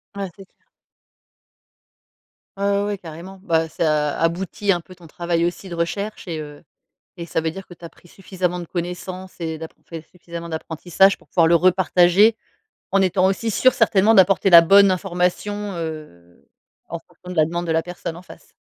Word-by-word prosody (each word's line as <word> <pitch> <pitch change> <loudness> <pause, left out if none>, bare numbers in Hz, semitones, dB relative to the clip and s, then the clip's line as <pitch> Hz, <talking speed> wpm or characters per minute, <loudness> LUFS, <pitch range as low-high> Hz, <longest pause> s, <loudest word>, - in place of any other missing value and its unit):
Ouais 200 -1 -3
c'est 195 - -12
sûr. - - -46 2.0
Ouais 200 - -2
ouais 200 0 +2
ouais 205 -1 -2
carrément. 175 +3 -11
Bah, 165 -3 +1
ça 150 -3 0
aboutit 180 +4 0
un 175 - -3
peu 165 +3 -15
ton 175 -2 -16
travail 170 +1 -1
aussi 175 +2 -4
de 170 - -6
recherche 200 +6 -4
et 165 -2 -4
heu, 150 -1 -11 0.5
et 170 - -6
ça 165 - -2
veut 160 - -1
dire 195 +3 -9
que 175 - -12
tu 170 - -12
as - - -8
pris 175 - -22
suffisamment 180 -2 -3
de 175 - -6
connaissances 180 +2 -6
et 160 -1 -4
d'appro 160 +1 -11
fait 165 -2 -7
suffisamment 170 -1 -9
d'apprentissage 170 +4 +1
pour - - -25
pouvoir 165 -2 +3
le 170 - +4
repartager. 185 +4 +4 0.6
En 195 0 +3
étant 185 0 +2
aussi 195 +4 -1
sûr 255 +4 +3
certainement 210 +2 +3
d'apporter 195 0 +4
la 170 -1 +10
bonne 200 +3 +6
information, 190 +3 -2
heu, 150 - -8 0.4
en 170 - -5
fonction 175 +1 -15
de 180 - -9
la 155 - +5
demande 170 +2 -4
de 165 - 0
la 165 - +1
personne 175 -1 -7
en 175 - -11
face. - - -16
175 Hz, 190 wpm, -21 LUFS, 165-195 Hz, 2.0 s, la